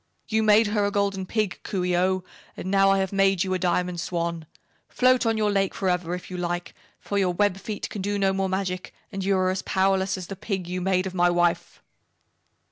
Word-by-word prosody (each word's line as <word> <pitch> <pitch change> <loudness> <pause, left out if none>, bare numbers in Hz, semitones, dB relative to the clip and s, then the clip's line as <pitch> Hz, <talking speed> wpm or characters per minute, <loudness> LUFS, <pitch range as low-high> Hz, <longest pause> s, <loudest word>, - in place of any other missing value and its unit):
You 220 0 +2
made 215 +1 +5
her 210 0 0
a 200 - +2
Golden 200 -2 -1
Pig, 215 -4 -1
Coo 190 -3 -3
ee 180 -1 +1
oh, 185 +1 +1 0.3
and 185 - -4
now 195 0 +5
I 195 - +4
have 190 0 -1
made 195 -2 +3
you 190 -1 -2
a 185 - 0
Diamond 180 -1 0
Swan. 170 -2 -3 0.4
Float 255 -1 +3
on 225 -1 +1
your 210 -1 +1
lake 195 -1 0
forever, 180 -2 -1
if 180 - -9
you 180 - -4
like, 175 0 -3 0.3
for 200 - -2
your 180 -2 +1
web 205 -1 +2
feet 205 +1 -5
can 205 - -6
do 205 +1 -1
no 195 -1 +2
more 190 0 -1
magic 185 -1 -3 0.2
and 195 0 -4
you 195 0 +2
are 185 0 +2
as 190 0 -2
powerless 190 0 +1
as 185 - -6
the 195 - -7
Pig 190 -2 -4
you 180 +1 -3
made 185 0 +1
of 190 - -4
my 175 -1 +3
wife! 175 -1 0
190 Hz, 225 wpm, -25 LUFS, 180-200 Hz, 0.4 s, made